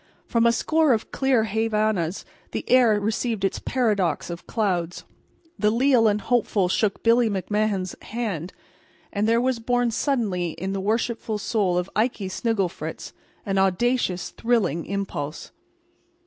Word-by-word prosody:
From 230 0 +2
a - - +5
score 310 +4 +2
of 220 - -2
clear 265 -4 +2
Havanas 215 -5 0 0.3
the - - -4
air 240 -5 +5
received 215 0 -1
its 195 - -1
paradox 205 - 0
of 170 - -8
clouds. 180 -6 -1 0.6
The 210 - +3
leal 240 0 +4
and 210 0 +1
the - - -15
hopeful 215 -6 +1
shook 200 +1 0
Billy 230 0 +4
McMahan's 200 -1 -1
hand. 205 -8 -4 0.6
And 210 +1 0
there 230 +1 +3
was 255 -1 0
born 245 +1 +1
suddenly 205 - -1
in 190 +2 -4
the 195 - -2
worshipful 220 +1 -1
soul 200 -4 0
of 180 0 -1
Ikey 215 -3 0
Snigglefritz 200 -3 -3 0.3
an 195 -2 0
audacious, 190 0 +1
thrilling 225 -9 0
impulse. 185 -7 -4
215 Hz, 140 wpm, -24 LUFS, 190-235 Hz, 0.6 s, a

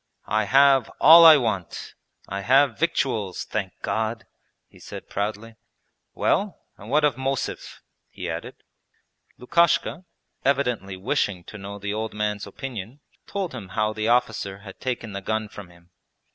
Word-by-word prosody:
'I 110 0 0
have 135 +1 +4
all 165 +3 +9
I 160 -2 +10
want. 110 -9 -3 0.3
I 100 +1 -4
have 135 +2 +3
victuals, 120 - -1
thank 95 -4 -4
God!' 110 +2 -2 0.4
he - - -20
said - - -9
proudly. 110 +2 -4 0.6
'Well, 200 -2 0 0.2
and 105 +2 -12
what 150 +3 +3
of 145 -5 +2
Mosev?' 135 0 -4 0.3
he - - -7
added. - - -6 0.7
Lukashka, 170 +5 +1 0.4
evidently 125 -9 0
wishing 95 -1 -1
to 105 - -10
know 100 +1 -7
the 100 0 -4
old 110 0 -4
man's 105 -1 -2
opinion, 120 +2 -7 0.3
told 195 -6 -3
him 105 -7 -8
how 110 0 +1
the 110 0 -2
officer 110 -5 0
had 95 -2 -12
taken 115 -4 -4
the 100 - -5
gun 110 +2 -2
from 100 -3 -11
him. 85 0 -21
110 Hz, 145 wpm, -24 LUFS, 100-135 Hz, 0.7 s, I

